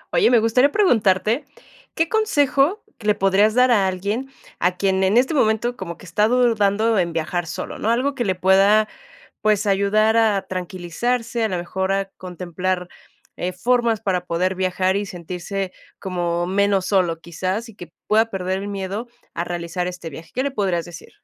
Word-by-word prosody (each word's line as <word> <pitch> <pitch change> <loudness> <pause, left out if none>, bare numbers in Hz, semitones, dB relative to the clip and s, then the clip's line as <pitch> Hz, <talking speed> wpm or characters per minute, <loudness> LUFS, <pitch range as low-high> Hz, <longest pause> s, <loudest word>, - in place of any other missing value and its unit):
Oye, 480 - +5
me 245 - +5
gustaría 240 +5 +3
preguntarte, 225 - +2 0.5
¿qué 330 0 +2
consejo 330 -4 +2 0.2
le 210 -1 +1
podrías 195 +3 +3
dar 250 0 +5
a 200 -5 +4
alguien 200 +8 -3 0.3
a 180 +1 +1
quien 190 0 +1
en 190 +4 +3
este 260 +5 +3
momento 235 -2 +1
como 170 -7 -7
que - - -14
está 210 +5 +2
dudando 225 -3 +2
en 170 -2 0
viajar 165 +2 -2
solo, - - -6
no?, 220 - -1
algo 255 +5 +1
que 250 - -2
le 190 -4 0
pueda, 195 +4 +4 0.5
pues, 215 -1 +2
ayudar 205 +3 +3
a 215 -3 +3
tranquilizarse, 190 +7 -2
a - - +2
lo 185 -4 -2
mejor 190 +2 -2
a 195 0 0
contemplar, 180 0 -3 0.5
eh, 180 +1 -3
formas 235 +3 +1
para 185 -4 -1
poder 180 +2 0
viajar 185 0 0
y 205 +1 -1
sentirse 180 +2 -5 0.3
como 175 -2 -2
menos 195 -1 +1
solo 180 -5 +1
quizás, 185 +7 -3
y 220 - -14
que 175 -4 -11 0.2
pueda 225 +2 +3
perder 185 0 -2
el - - -5
miedo 200 +3 -4 0.3
a 170 - -1
realizar 175 0 -3
este 180 -2 -6
viaje, 160 +3 -11
¿qué 255 - -1
le 280 - 0
podrías 190 -9 -1
decir? 175 -2 -11
195 Hz, 175 wpm, -21 LUFS, 180-225 Hz, 0.5 s, Oye